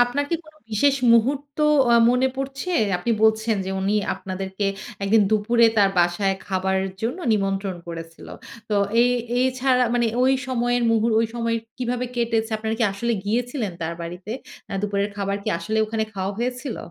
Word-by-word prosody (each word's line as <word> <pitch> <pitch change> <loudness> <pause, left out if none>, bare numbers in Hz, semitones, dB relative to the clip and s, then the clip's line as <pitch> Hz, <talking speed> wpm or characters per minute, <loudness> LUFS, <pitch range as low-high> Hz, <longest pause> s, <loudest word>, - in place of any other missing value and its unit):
আপনার 280 +4 -1
কি 335 - +2
কোন 310 0 -18 0.2
বিশেষ 275 +6 +3 0.2
মুহূর্ত 275 +5 +1 0.3
আ - - +7 0.2
মনে 250 +1 +2
পড়ছে? 275 +6 -4 0.2
আপনি 180 +7 -3
বলছেন 220 0 +3
যে 190 - -4
উনি 195 +2 0 0.2
আপনাদেরকে 190 +1 -4 0.4
১ 195 - -1
দিন 220 - +7
দুপুরে 225 +2 +3
তার 195 -1 +5
বাসায় 185 +3 +2
খাবারের 190 0 0
জন্য 245 +10 -2
নিমন্ত্রণ 195 -2 -1
করেছিল। 165 -1 -8 0.4
তো 210 - +1 0.3
এ - - +5 0.4
এছাড়া 255 0 +2
মানে 240 -1 +2 0.2
ওই 260 +1 +4 0.2
সময়ের 245 -1 +1
মুহর 225 0 +2
ওই 230 - +2
সময় 230 -1 0 0.2
কিভাবে 250 0 -1
কেটেছে? 230 -1 0
আপনারা 220 0 -2
কি 230 - +3
আসলে 235 +4 -1
গিয়েছিলেন 235 0 -1
তার 165 +1 -3
বাড়িতে? 180 +5 -6 0.4
আ - - -6
দুপুরের 200 0 0
খাবার 200 0 -1
কি - - -2
আসলে 215 +6 -2
ওখানে 220 0 -1
খাওয়া 190 0 -2
হয়েছিল? 250 +1 -3
220 Hz, 165 wpm, -23 LUFS, 195-245 Hz, 0.4 s, আ